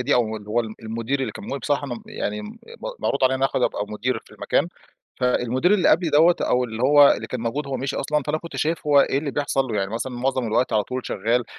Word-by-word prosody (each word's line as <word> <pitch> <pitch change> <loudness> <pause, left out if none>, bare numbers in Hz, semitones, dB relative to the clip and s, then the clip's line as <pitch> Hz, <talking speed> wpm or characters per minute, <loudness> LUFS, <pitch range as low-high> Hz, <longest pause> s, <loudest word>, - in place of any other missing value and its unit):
دي، 125 - +2
أو 110 -3 +1
اللي 105 -1 -11
هو 115 +3 +2
ال 110 -2 -6
المدير 115 +5 -2
اللي 130 - -2
كان - - -9
موجود 140 - -4
بصراحة 145 -1 -1
ممب 220 +9 -7
يعني 215 0 -3
م - - -7 0.3
م - - -4
معروض 140 - 0
عليَّ 130 +1 +2
آخد 135 - 0
أبقى 105 - 0
مدير 110 +4 -2
في - - -21
المكان. - - 0 0.5
فالمدير 125 - +2
اللي 185 -5 +3
قبلي 165 -1 +3
دوَّة، 165 +4 +5
أو 125 0 +2
اللي 115 -1 -5
هوّ، 145 +2 +7
اللي 110 - -4
كان 125 +1 -5
موجود- 130 +6 -2
هوّ 135 - -2
مشي 130 +2 -3
أصلًا- 150 +2 0
فأنا 155 +1 0
كنت 170 +1 -9
شايف 160 0 -1
هوّ 145 -1 +6
إيه 135 - +2
اللي 145 0 -3
بيحصل 140 -1 0
له. 115 -5 -3
يعني 95 0 -1
مثلًا 125 +3 -3
معظم 130 0 -1
الوقت 115 +3 +1
على 110 -1 +3
طول 130 0 -5
شغّال، 115 +5 0
130 Hz, 255 wpm, -23 LUFS, 115-145 Hz, 0.5 s, هوّ